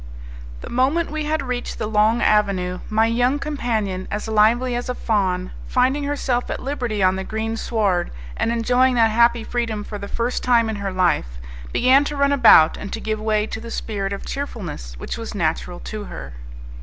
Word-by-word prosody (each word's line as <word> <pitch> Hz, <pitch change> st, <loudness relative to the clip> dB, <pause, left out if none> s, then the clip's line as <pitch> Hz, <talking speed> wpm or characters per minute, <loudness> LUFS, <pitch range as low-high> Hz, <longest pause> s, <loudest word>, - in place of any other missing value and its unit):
The -, -, -8 dB
moment 280 Hz, +7 st, +1 dB
we 310 Hz, -1 st, -3 dB
had 305 Hz, -1 st, -1 dB
reached 250 Hz, -2 st, -4 dB
the -, -, -3 dB
long 215 Hz, +2 st, +2 dB
avenue, 190 Hz, -4 st, +1 dB
my 220 Hz, +1 st, +3 dB
young 245 Hz, +4 st, +2 dB
companion, 225 Hz, -11 st, -2 dB
as 210 Hz, +2 st, -4 dB
lively 230 Hz, +4 st, +3 dB
as 245 Hz, +1 st, -3 dB
a 250 Hz, -, -2 dB
fawn, 185 Hz, -6 st, -1 dB, 0.2 s
finding 265 Hz, +3 st, +1 dB
herself 265 Hz, -4 st, -1 dB
at -, -, -3 dB
liberty 245 Hz, -7 st, -2 dB
on 185 Hz, 0 st, +3 dB
the 190 Hz, -, -3 dB
green 220 Hz, +2 st, -3 dB
sward, 205 Hz, -6 st, 0 dB, 0.3 s
and 230 Hz, -, 0 dB
enjoying 245 Hz, +2 st, +2 dB
that 225 Hz, -2 st, +4 dB
happy 235 Hz, +1 st, +3 dB
freedom 230 Hz, -3 st, -2 dB
for 205 Hz, 0 st, -7 dB
the 200 Hz, -, -6 dB
first 235 Hz, +3 st, -2 dB
time 235 Hz, -3 st, +3 dB
in 215 Hz, -, -4 dB
her 200 Hz, -1 st, -3 dB
life, 175 Hz, -, 0 dB, 0.3 s
began 260 Hz, +3 st, +4 dB
to 295 Hz, 0 st, -4 dB
run 280 Hz, 0 st, +3 dB
about 230 Hz, -, +6 dB
and 200 Hz, -, -7 dB
to 225 Hz, -, -3 dB
give 215 Hz, -1 st, -3 dB
way 215 Hz, -1 st, +1 dB
to 220 Hz, 0 st, -6 dB
the 230 Hz, -, -8 dB
spirit 200 Hz, -4 st, -3 dB
of 200 Hz, -, -5 dB
cheerfulness 180 Hz, -, -6 dB
which -, -, -5 dB
was 225 Hz, -2 st, -6 dB
natural 175 Hz, 0 st, -2 dB
to 215 Hz, -1 st, -6 dB
her. 70 Hz, -, -8 dB
225 Hz, 195 wpm, -21 LUFS, 200-250 Hz, 0.3 s, about